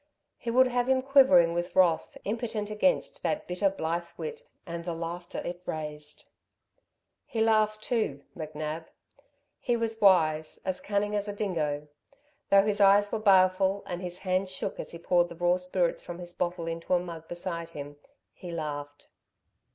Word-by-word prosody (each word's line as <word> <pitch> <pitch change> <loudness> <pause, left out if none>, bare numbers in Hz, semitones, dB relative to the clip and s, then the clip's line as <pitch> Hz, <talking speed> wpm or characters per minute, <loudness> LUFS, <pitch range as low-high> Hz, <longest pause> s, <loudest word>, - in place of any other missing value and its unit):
He 235 - -4
would 255 +2 +5
have 245 0 0
him 260 0 +3
quivering 255 -12 +6
with 175 +1 -3
wrath, 175 -3 +3
impotent 215 -1 -2
against 215 +6 +1
that 305 - -1
bitter, 180 +3 +1
blithe 170 -2 -2
wit 465 0 -5 0.2
and 170 -1 -5
the 170 -1 -3
laughter 170 +1 -5
it 175 0 -5
raised. 150 -1 -5 1.0
He 225 - -4
laughed 215 -1 +2
too 180 - -1
McNab. 155 0 -5 0.7
He 240 -2 0
was 225 -1 -2
wise, 160 -6 +4
as 185 -1 -2
cunning 205 0 0
as 205 0 -1
a 205 - -3
dingo. 155 -8 -2 0.6
Though 195 0 +6
his 210 -1 +1
eyes 200 +1 +6
were 225 - -1
baleful, 190 -1 +4
and 175 0 -5
his 180 -1 -4
hands 185 0 -1
shook 185 - -4
as - - -5
he 170 - -7
poured 175 +1 +2
the 170 - -9
raw 175 +1 +2
spirits 180 -1 -1
from 175 - -7
his 175 -1 -8
bottle 175 -1 -2
into 165 +2 -1
a - - +3
mug 165 -2 -8
beside 170 -1 -4
him, 145 -2 -8 0.4
he 180 - -10
laughed. 145 -3 -5
180 Hz, 165 wpm, -28 LUFS, 165-210 Hz, 1.0 s, quivering